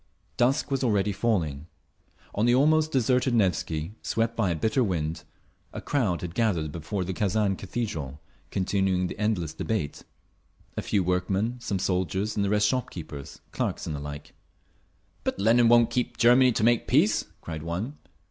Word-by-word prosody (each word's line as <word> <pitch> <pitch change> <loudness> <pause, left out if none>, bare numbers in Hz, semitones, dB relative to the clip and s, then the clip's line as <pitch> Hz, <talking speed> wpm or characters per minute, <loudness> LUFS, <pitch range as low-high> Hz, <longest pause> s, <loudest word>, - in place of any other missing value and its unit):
Dusk 135 +4 +1
was 135 -1 0
already 105 -4 +2
falling. 85 -9 -1 0.7
On 110 +3 +1
the 120 - +5
almost 155 +3 +3
deserted 125 -1 +2
Nevsky, 85 -4 0
swept 115 +1 -1
by 110 -5 +1
a 85 - 0
bitter 110 - +1
wind, 80 -5 -2 0.5
a - - -5
crowd 110 -12 0
had 85 -2 -5
gathered 90 -9 0
before 85 +5 -3
the 95 +1 -3
Kazan 100 0 +1
Cathedral, 90 - -4 0.3
continuing 95 -1 0
the 90 - -6
endless 100 -8 0
debate; 80 -3 -3 0.7
a - - -2
few 100 - 0
workmen, 95 +6 0
some 110 -5 -2
soldiers 95 +3 -1
and 105 - +1
the 100 - 0
rest 105 0 +3
shop 125 +2 -1
keepers, 75 -5 -9
clerks - - -2
and 75 - -3
the - - -5
like. 75 0 -8 0.9
"But - - -2
Lenin 115 +4 +4
won't 120 -1 +5
get 125 0 -1
Germany 125 +2 +6
to 110 - -1
make 120 +1 +3
peace!" - - +3 0.2
cried 80 -2 -6
one. 95 - -4
100 Hz, 165 wpm, -27 LUFS, 85-120 Hz, 0.9 s, Germany